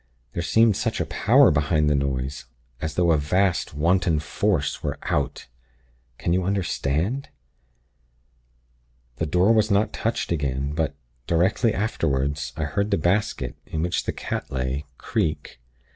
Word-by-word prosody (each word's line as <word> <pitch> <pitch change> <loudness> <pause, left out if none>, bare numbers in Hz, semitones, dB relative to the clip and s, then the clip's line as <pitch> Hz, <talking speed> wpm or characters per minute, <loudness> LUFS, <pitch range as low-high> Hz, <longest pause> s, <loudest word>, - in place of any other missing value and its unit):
There 85 - -2
seemed 110 +5 +4
such 110 +2 -1
a 85 - 0
power 120 - +5
behind 75 +1 +2
the 75 - +3
noise; 70 -2 -2 0.4
as 80 -1 -3
though 85 -2 +3
a 80 - +3
vast, 90 +2 +1
wanton 85 +1 +2
Force 80 +1 -1
were - - -3
'out.' - - -1 0.7
Can 85 - 0
you 90 +1 +1
understand? 95 - -1 1.9
"The 80 - -1
door 90 +8 +4
was 110 -1 +3
not 100 +1 +2
touched 115 -4 -2
again; 70 -2 -1
but, 80 -2 -1 0.3
directly 95 +8 +2
afterward, 70 -9 0 0.2
I 80 - -1
heard 100 +8 -1
the 100 - +2
basket, 85 - 0
in 80 0 -2
which 85 0 -1
the - - 0
cat - - -4
lay, 65 +2 -2
creak. 75 -5 -2
85 Hz, 145 wpm, -24 LUFS, 75-100 Hz, 1.9 s, power